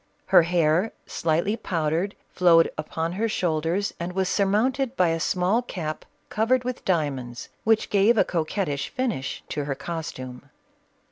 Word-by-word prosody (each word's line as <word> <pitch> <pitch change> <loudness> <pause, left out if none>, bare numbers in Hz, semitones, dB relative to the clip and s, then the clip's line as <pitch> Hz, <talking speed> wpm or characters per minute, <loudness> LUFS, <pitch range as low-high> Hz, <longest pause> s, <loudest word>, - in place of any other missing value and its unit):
Her 190 -2 +7
hair, 170 +3 +2
slightly 170 +6 0
powdered, 170 0 -1 0.2
flowed 170 -2 +5
upon 160 +2 -3
her 220 +5 -1
shoulders 175 +1 0
and 175 +1 -4
was 190 0 0
surmounted 235 +6 +1
by 180 -7 +3
a 165 0 0
small 185 +7 +1
cap 165 -10 -5 0.2
covered 245 +4 +2
with 250 0 -4
diamonds, 135 -9 -2 0.2
which 220 0 +2
gave 205 +3 +4
a - - +6
coquettish 155 -3 -2
finish 235 - -3
to 145 -1 -3
her 140 -1 -2
costume. 140 -4 -6
175 Hz, 140 wpm, -25 LUFS, 155-205 Hz, 0.2 s, Her